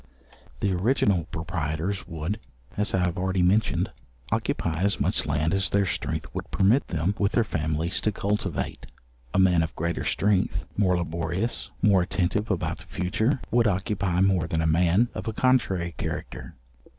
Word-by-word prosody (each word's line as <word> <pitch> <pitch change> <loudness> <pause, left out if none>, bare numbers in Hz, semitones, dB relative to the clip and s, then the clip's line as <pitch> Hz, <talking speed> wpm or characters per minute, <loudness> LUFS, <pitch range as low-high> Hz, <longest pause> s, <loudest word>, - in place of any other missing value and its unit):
The 100 - +1
original 95 -3 +2
proprietors 80 +3 -3
would 80 +7 -3 0.4
(as 105 -1 +1
I 90 -1 +2
have 90 +1 -2
already 95 0 +1
mentioned) 100 +4 +2 0.4
occupy 80 +1 -1
as 100 +1 +2
much - - +1
land 75 +4 +1
as 95 -3 +1
their 100 0 +2
strength 85 - -2
would - - -5
permit 105 +8 +3
them 85 +4 0
with 100 0 +1
their 115 - +4
families 80 -2 -1
to 110 - +1
cultivate. 100 -4 -2 0.4
A - - -1
man 90 -3 +5
of 80 - -3
greater 85 +1 -2
strength, 95 -3 +1
more 95 -3 +2
laborious, 85 +6 -2
more 100 -3 +5
attentive 95 +4 -1
about 95 -5 -1
the - - -11
future, 110 +9 0
would 115 -1 +4
occupy 95 -2 0
more 95 -4 +3
than 80 0 0
a - - +1
man 90 +8 +3
of - - -6
a 110 - -1
contrary 95 -10 +1
character. - - -5
95 Hz, 165 wpm, -26 LUFS, 85-100 Hz, 0.4 s, man